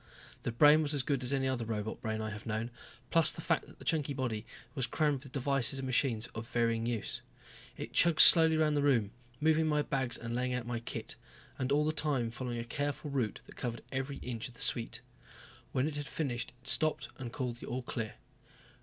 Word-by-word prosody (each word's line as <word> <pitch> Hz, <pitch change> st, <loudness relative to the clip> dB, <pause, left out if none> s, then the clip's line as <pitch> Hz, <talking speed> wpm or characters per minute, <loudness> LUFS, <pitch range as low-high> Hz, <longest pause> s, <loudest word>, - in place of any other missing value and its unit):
The -, -, -3 dB
brain 150 Hz, +6 st, +6 dB
was 150 Hz, -1 st, -1 dB
as 140 Hz, -, 0 dB
good 140 Hz, -2 st, -1 dB
as 125 Hz, +1 st, -1 dB
any 135 Hz, -1 st, +1 dB
other 130 Hz, -3 st, -1 dB
robot 110 Hz, -1 st, -4 dB
brain 110 Hz, 0 st, -3 dB
I 110 Hz, 0 st, -4 dB
have 105 Hz, +1 st, -8 dB
known, 110 Hz, +2 st, -3 dB, 0.4 s
plus 165 Hz, -2 st, +4 dB
the -, -, -10 dB
fact -, -, 0 dB
that -, -, -16 dB
the -, -, -14 dB
chunky 150 Hz, -3 st, 0 dB
body 115 Hz, -4 st, -3 dB, 0.3 s
was 130 Hz, -4 st, -2 dB
crammed 145 Hz, 0 st, 0 dB
with 135 Hz, -2 st, -12 dB
devices 135 Hz, -1 st, +1 dB
and 135 Hz, -, -4 dB
machines 125 Hz, -3 st, +1 dB
of 110 Hz, +1 st, -6 dB
varying 115 Hz, -1 st, 0 dB
use. 115 Hz, -4 st, -3 dB, 0.6 s
It -, -, -7 dB
chugged 170 Hz, -2 st, +4 dB
slowly 160 Hz, -2 st, +10 dB
around 155 Hz, -1 st, +2 dB
the 145 Hz, -, +1 dB
room, 120 Hz, -8 st, +2 dB, 0.3 s
moving 160 Hz, +1 st, +3 dB
my 150 Hz, -1 st, +1 dB
bags 130 Hz, -4 st, -1 dB
and 115 Hz, 0 st, -6 dB
laying 125 Hz, +1 st, -1 dB
out 125 Hz, -2 st, -3 dB
my 120 Hz, -1 st, -3 dB
kit. 115 Hz, -, -6 dB, 0.4 s
And 130 Hz, +1 st, -1 dB
all 150 Hz, +1 st, +3 dB
the 155 Hz, -, 0 dB
time 135 Hz, -7 st, 0 dB
following 120 Hz, 0 st, -5 dB
a 115 Hz, -, -3 dB
careful 145 Hz, +4 st, -3 dB
route 125 Hz, -7 st, -2 dB
that -, -, -15 dB
covered 120 Hz, -2 st, -4 dB
every 135 Hz, +1 st, -3 dB
inch 120 Hz, -3 st, -4 dB
of 125 Hz, -, -15 dB
the -, -, -14 dB
suite. 115 Hz, -1 st, +1 dB, 0.7 s
When 130 Hz, +3 st, 0 dB
it 150 Hz, -2 st, -4 dB
had 145 Hz, -1 st, -5 dB
finished 125 Hz, -7 st, -3 dB
it 125 Hz, -, -7 dB
stopped 135 Hz, +4 st, +2 dB
and 120 Hz, -3 st, -6 dB
called 125 Hz, -2 st, -4 dB
the -, -, -10 dB
all 125 Hz, +1 st, -3 dB
clear. 110 Hz, -2 st, -5 dB
130 Hz, 220 wpm, -32 LUFS, 115-145 Hz, 0.7 s, slowly